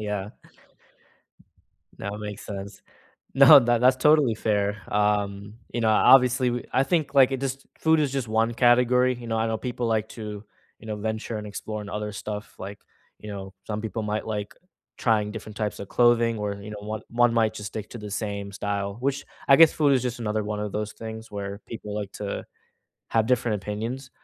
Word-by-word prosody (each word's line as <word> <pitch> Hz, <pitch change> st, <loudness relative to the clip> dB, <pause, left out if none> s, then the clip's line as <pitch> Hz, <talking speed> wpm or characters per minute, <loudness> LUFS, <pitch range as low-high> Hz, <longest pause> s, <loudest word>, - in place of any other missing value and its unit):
Yeah. 105 Hz, -1 st, -3 dB, 1.7 s
That 100 Hz, +1 st, -5 dB
makes 105 Hz, -1 st, -7 dB
sense. 100 Hz, 0 st, -7 dB, 0.5 s
No, -, -, +10 dB
that 120 Hz, -1 st, +2 dB
that's 130 Hz, +1 st, +5 dB
totally 150 Hz, -4 st, +4 dB
fair. 105 Hz, -2 st, -1 dB
Um, 105 Hz, 0 st, 0 dB, 0.2 s
you 120 Hz, -, -2 dB
know, 110 Hz, -1 st, +3 dB
obviously, 125 Hz, +2 st, +5 dB
w 120 Hz, 0 st, -2 dB
I 130 Hz, -, +3 dB
think, 155 Hz, -1 st, 0 dB
like, 135 Hz, -2 st, +6 dB
it 135 Hz, -, -2 dB
just 135 Hz, 0 st, -4 dB
food 160 Hz, 0 st, +3 dB
is 145 Hz, -3 st, +1 dB
just 135 Hz, -4 st, -2 dB
one 115 Hz, +1 st, +1 dB
category. 125 Hz, +1 st, +4 dB
You 120 Hz, -1 st, -9 dB
know, 115 Hz, -, -1 dB
I 110 Hz, +1 st, +1 dB
know 110 Hz, 0 st, -1 dB
people 125 Hz, 0 st, -3 dB
like 110 Hz, -1 st, 0 dB
to, 105 Hz, -2 st, -7 dB, 0.4 s
you -, -, -14 dB
know, 105 Hz, -1 st, -3 dB
venture 110 Hz, +2 st, -3 dB
and 105 Hz, -, -7 dB
explore 105 Hz, +1 st, -5 dB
in 100 Hz, -, -8 dB
other 105 Hz, +1 st, -4 dB
stuff. 105 Hz, 0 st, -6 dB
Like, 100 Hz, +2 st, -7 dB, 0.4 s
you 105 Hz, -, -9 dB
know, 95 Hz, -1 st, -7 dB
some 105 Hz, -1 st, -3 dB
people 110 Hz, 0 st, -4 dB
might 105 Hz, +1 st, -2 dB
like 105 Hz, -2 st, -4 dB, 0.4 s
trying 105 Hz, -3 st, +1 dB
different 105 Hz, -1 st, -8 dB
types 105 Hz, -2 st, -2 dB
of 100 Hz, -, -7 dB
clothing 120 Hz, -1 st, +3 dB
where, 100 Hz, -1 st, -3 dB
you 105 Hz, +1 st, -8 dB
know, 105 Hz, -, -7 dB
one 110 Hz, +1 st, -5 dB
one 120 Hz, 0 st, +3 dB
might 110 Hz, -2 st, +3 dB
just 105 Hz, 0 st, -6 dB
stick 105 Hz, -1 st, -7 dB
to 120 Hz, -, -8 dB
the 105 Hz, -1 st, -7 dB
same 100 Hz, -1 st, -4 dB
style, 100 Hz, 0 st, -3 dB
which 140 Hz, +2 st, -1 dB, 0.2 s
I 135 Hz, -, +7 dB
guess 165 Hz, -1 st, +8 dB
food 145 Hz, -3 st, +3 dB
is 130 Hz, -3 st, +3 dB
just 125 Hz, -1 st, -3 dB
another 110 Hz, -1 st, -1 dB
one 105 Hz, 0 st, -3 dB
of 105 Hz, -1 st, -4 dB
those 105 Hz, 0 st, -3 dB
things 110 Hz, 0 st, -8 dB
where 100 Hz, 0 st, -5 dB
people 105 Hz, -2 st, -7 dB
like 105 Hz, -2 st, -4 dB
to 100 Hz, -1 st, -5 dB, 0.6 s
have 110 Hz, -1 st, +2 dB
different 120 Hz, -5 st, +1 dB
opinions. 115 Hz, +6 st, -4 dB
110 Hz, 200 wpm, -25 LUFS, 105-120 Hz, 1.7 s, No